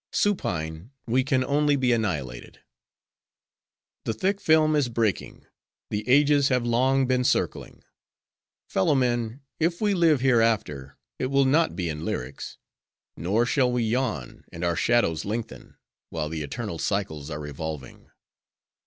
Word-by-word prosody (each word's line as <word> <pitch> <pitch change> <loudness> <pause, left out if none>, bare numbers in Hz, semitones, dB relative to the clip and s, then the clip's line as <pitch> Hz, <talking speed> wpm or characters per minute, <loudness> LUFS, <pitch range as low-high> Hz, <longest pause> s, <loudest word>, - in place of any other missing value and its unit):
Supine 85 - -1 0.2
we 125 +3 +2
can 130 -2 +1
only 145 +2 +2
be, 130 -3 +1
annihilated. 80 - -2 1.5
"'The 115 - 0
thick 195 - -1
film 155 -1 +4
is 145 -4 +1
breaking; 110 -6 -2 0.5
the 105 +3 -3
ages 145 +1 +5
have 125 -3 +1
long 130 +3 +2
been 125 0 +1
circling. - - -1 0.8
Fellow 95 +10 +2
men! 120 -1 0 0.2
if 170 +1 +1
we 210 -2 +2
live 165 -7 +3
hereafter, 115 - +1 0.2
it 130 - 0
will 140 +1 +3
not 155 +5 +2
be 90 -3 -2
in 75 -1 -4
lyrics; 65 -3 -5 0.6
nor 100 +9 +1
shall 130 0 +2
we 125 -1 0
yawn, 110 - -2
and 85 - -7
our 85 -1 +1
shadows 85 -3 +2
lengthen, 115 +3 -6 0.3
while 80 -2 -3
the 80 -1 -4
eternal 85 - -5
cycles 80 -8 -2
are 75 -1 -5
revolving. 75 -2 -7
120 Hz, 135 wpm, -25 LUFS, 85-135 Hz, 1.5 s, ages